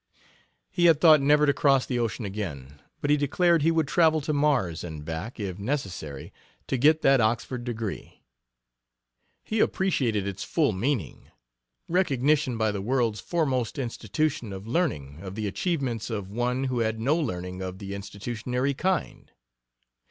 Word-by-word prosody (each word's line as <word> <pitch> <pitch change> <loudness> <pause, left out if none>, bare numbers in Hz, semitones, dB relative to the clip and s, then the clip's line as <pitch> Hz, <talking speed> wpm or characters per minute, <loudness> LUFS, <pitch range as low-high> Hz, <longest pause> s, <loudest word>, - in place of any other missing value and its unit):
He 175 -2 +2
had 165 -3 +6
thought 155 -3 +7
never 150 +2 +4
to 140 - +3
cross 135 -3 +3
the 125 -2 -2
ocean 115 -1 -2
again, 75 -9 -6 0.2
but 145 - +1
he 150 - +5
declared 170 +4 +2
he 160 - +3
would 165 -3 +1
travel 160 0 +4
to 150 +2 -2
Mars 140 - +1
and 80 -3 -7
back, 85 +10 -5
if 95 -2 -4
necessary, 100 - -4 0.3
to - - -1
get 155 +5 +4
that 135 -2 +5
Oxford 120 +2 -1
degree. 115 -4 -5 1.2
He 220 - -2
appreciated 120 - +1
its 100 0 -4
full 155 -7 +1
meaning 110 - -2 0.6
recognition 145 -6 +1
by 110 -1 +1
the 100 -1 -4
world's 115 -1 0
foremost 135 -9 -1
institution 125 0 -2
of 95 +1 -7
learning 110 - -1
of 95 -1 -7
the 110 -1 -3
achievements 130 - -2
of 100 -4 -4
one 125 +4 -1
who 130 -2 -1
had 110 -1 0
no 135 +7 +2
learning 90 - -3
of 95 0 -5
the 100 0 -7
institutionary 120 +6 -3
kind. 185 +5 -2
120 Hz, 155 wpm, -26 LUFS, 100-150 Hz, 1.2 s, thought